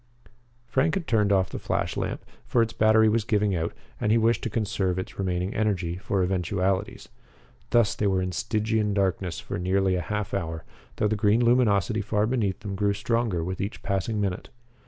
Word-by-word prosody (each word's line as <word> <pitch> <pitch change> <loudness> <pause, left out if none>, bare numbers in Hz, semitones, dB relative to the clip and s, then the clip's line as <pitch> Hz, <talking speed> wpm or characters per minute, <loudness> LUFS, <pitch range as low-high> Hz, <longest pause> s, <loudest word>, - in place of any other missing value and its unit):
Frank 130 +6 +1
had 190 -4 -2
turned 105 -5 +2
off 95 -2 +2
the - - -4
flashlamp, - - -2 0.3
for 120 - +3
its 115 - -4
battery 110 0 +4
was 110 +1 +2
giving 105 -3 +1
out 80 0 -1 0.3
and 105 - +1
he 115 - +5
wished 115 +1 +2
to 115 - -2
conserve 100 -4 -1
its 95 - -6
remaining 90 0 -1
energy 95 -6 0
for 95 0 -1
eventualities. 95 +2 -1 0.6
Thus 115 -3 +3
they 105 - 0
were 95 -1 +2
in 90 - -2
Stygian 110 0 0
darkness 95 -3 0
for - - -5
nearly 95 +1 +1
a 90 - 0
half 105 +1 -3
hour, 80 -4 -3 0.3
though 105 - +1
the 110 - 0
green 105 +3 +3
luminosity 110 -3 +3
far 105 +1 0
beneath 110 -6 -1
them 100 -1 -5
grew 100 +1 +1
stronger 110 -4 0
with 95 +2 -4
each 100 +2 -5
passing 100 +2 -1
minute. 95 -3 -2
100 Hz, 185 wpm, -26 LUFS, 95-110 Hz, 0.6 s, he